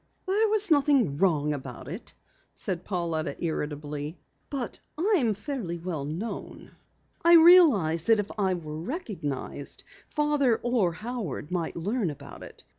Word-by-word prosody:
"There 410 Hz, +3 st, +2 dB
was 415 Hz, -3 st, +2 dB
nothing 275 Hz, -, +3 dB
wrong 150 Hz, -5 st, +2 dB
about 135 Hz, -3 st, -7 dB
it," 185 Hz, +9 st, -8 dB, 0.7 s
Pauletta 165 Hz, -6 st, -2 dB
said -, -, -10 dB
irritably. 150 Hz, 0 st, -3 dB, 0.3 s
"But 265 Hz, -5 st, -4 dB, 0.2 s
I'm 320 Hz, -, +2 dB
fairly 215 Hz, -, -4 dB
well 165 Hz, -4 st, -4 dB
known. 170 Hz, +10 st, -6 dB, 0.5 s
I 340 Hz, 0 st, +8 dB
realized 295 Hz, -, +6 dB
that 225 Hz, -1 st, +6 dB
if 205 Hz, -1 st, -2 dB
I 190 Hz, -3 st, +1 dB
were 155 Hz, -3 st, -6 dB
recognized, 165 Hz, -, -4 dB, 0.3 s
Father 295 Hz, -6 st, +2 dB
or 235 Hz, -7 st, +2 dB
Howard 200 Hz, -, -5 dB
might 175 Hz, -3 st, -2 dB
learn 200 Hz, +3 st, -1 dB
about 145 Hz, -, -9 dB
it. -, -, -12 dB
190 Hz, 130 wpm, -27 LUFS, -, 0.7 s, I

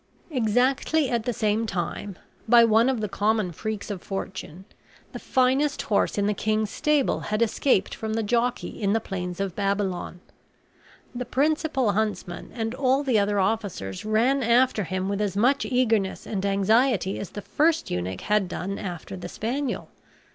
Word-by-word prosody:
Exactly 260 Hz, +4 st, +1 dB
at 235 Hz, -2 st, 0 dB
the 245 Hz, -, +1 dB
same 220 Hz, 0 st, 0 dB
time, 185 Hz, +1 st, -4 dB, 0.3 s
by 235 Hz, 0 st, +8 dB
one 230 Hz, +2 st, +4 dB
of 255 Hz, -4 st, -1 dB
the 210 Hz, -, -1 dB
common 210 Hz, -1 st, 0 dB
freaks 215 Hz, +4 st, -5 dB
of 190 Hz, -4 st, -5 dB
fortune, 190 Hz, -2 st, -6 dB, 0.5 s
the -, -, -7 dB
finest 265 Hz, +3 st, +1 dB
horse 205 Hz, 0 st, +1 dB
in 200 Hz, -, +1 dB
the 210 Hz, -, +2 dB
king's 215 Hz, 0 st, -1 dB
stable 300 Hz, -3 st, +1 dB
had 215 Hz, +2 st, 0 dB
escaped 220 Hz, -2 st, +1 dB
from 220 Hz, 0 st, -4 dB
the 225 Hz, -, 0 dB
jockey 240 Hz, +3 st, -1 dB
in 200 Hz, 0 st, +2 dB
the 225 Hz, -, +2 dB
plains 180 Hz, -4 st, -5 dB
of 195 Hz, -3 st, -2 dB
Babylon. 195 Hz, -3 st, -2 dB, 0.9 s
The 250 Hz, 0 st, -3 dB
principal 275 Hz, -2 st, +1 dB
huntsman 200 Hz, -4 st, -2 dB
and 225 Hz, -1 st, -2 dB
all 265 Hz, +1 st, +2 dB
the 250 Hz, -6 st, +3 dB
other 205 Hz, 0 st, +1 dB
officers 190 Hz, -, -2 dB
ran 230 Hz, +6 st, +2 dB
after 235 Hz, -2 st, +3 dB
him 185 Hz, +3 st, -2 dB
with 200 Hz, +1 st, -1 dB
as 200 Hz, -2 st, -1 dB
much 260 Hz, +6 st, +3 dB
eagerness 225 Hz, -7 st, +1 dB
and 195 Hz, -3 st, -3 dB
anxiety 200 Hz, +1 st, +2 dB
as 200 Hz, -, -5 dB
the 205 Hz, -, -8 dB
first 320 Hz, +2 st, +1 dB
eunuch 90 Hz, +1 st, -3 dB
had 210 Hz, -2 st, +1 dB
done 195 Hz, +2 st, -4 dB
after 180 Hz, 0 st, -6 dB
the 185 Hz, -, -7 dB
spaniel. 260 Hz, +5 st, -3 dB
215 Hz, 165 wpm, -25 LUFS, 195-250 Hz, 0.9 s, by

